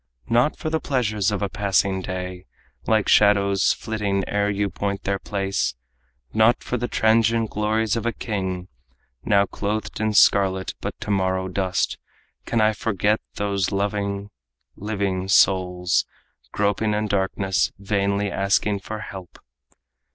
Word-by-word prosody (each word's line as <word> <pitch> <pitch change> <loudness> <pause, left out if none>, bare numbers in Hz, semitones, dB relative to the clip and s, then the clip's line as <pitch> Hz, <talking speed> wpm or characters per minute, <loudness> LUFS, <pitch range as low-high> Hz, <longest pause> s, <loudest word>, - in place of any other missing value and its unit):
Not 120 +6 +2
for 155 - -4
the 160 - +1
pleasures 110 -8 0
of 105 0 -2
a - - +1
passing 95 -1 0
day, 90 0 -6 0.4
Like 110 -2 +2
shadows 100 -1 +4
flitting 100 -3 -2
ere 105 0 0
you 100 0 0
point 100 -1 -3
their 100 0 -1
place, 95 - -2 0.6
Not 110 +2 +3
for - - -3
the 120 0 -2
transient 115 0 +2
glories 110 +1 0
of 115 0 -2
a - - +2
king, 95 -6 -4 0.6
Now 100 -1 +3
clothed 105 +2 -4
in 110 0 0
scarlet 95 -2 +4
but - - -5
to 105 - -3
morrow 95 -1 0
dust, 95 0 -1 0.5
Can 115 - +1
I 110 0 +4
forget 105 0 0
those 100 -1 -1
loving, 100 0 -2 0.4
living 100 -3 -2
souls, 90 -2 +3 0.4
Groping 105 +1 0
in 105 0 0
darkness, 95 -1 0
vainly 100 0 0
asking 100 +1 +1
help." 95 -3 -8
100 Hz, 135 wpm, -23 LUFS, 95-110 Hz, 0.6 s, shadows